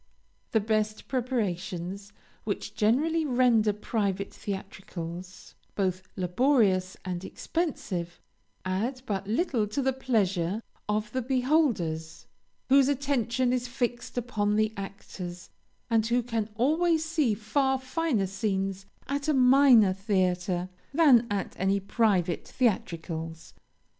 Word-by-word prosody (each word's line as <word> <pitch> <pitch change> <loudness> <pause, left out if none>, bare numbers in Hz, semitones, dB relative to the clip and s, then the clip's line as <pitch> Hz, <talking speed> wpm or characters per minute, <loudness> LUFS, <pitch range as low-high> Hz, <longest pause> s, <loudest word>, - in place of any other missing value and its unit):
The 220 - +4
best 215 0 -1
preparations, 200 -6 -2 0.3
which 205 0 -4
generally 300 +11 +2
render 245 -6 +3
private 200 -2 -2
theatricals 185 -2 -7 0.2
both 185 -2 0
laborious 185 -1 +2
and 180 -1 -3
expensive, 190 - -3 0.5
add 230 +8 -2
but 200 -3 -3
little 230 - +1
to 215 +7 -3
the 265 -1 +1
pleasure 205 -6 0 0.3
of 210 0 -1
the 255 - -1
beholders, 245 - 0 0.4
whose 270 0 +6
attention 255 -3 +1
is 250 -1 -1
fixed 240 -1 -3
upon 210 -4 0
the 215 0 +2
actors, 185 -2 -8 0.4
and 225 -2 +3
who 240 +1 +2
can 225 -2 -2
always 320 +6 +2
see 310 -9 +1
far 265 +6 +1
finer 260 - 0
scenes 195 0 -2 0.2
at 280 +2 -2
a 305 - +3
minor 250 -6 +6
theatre 185 -2 0 0.3
than 265 -8 +6
at 200 -2 -2
any 195 +1 +2
private 195 -4 +1
theatricals. 165 -8 -2
215 Hz, 115 wpm, -28 LUFS, 190-255 Hz, 0.5 s, whose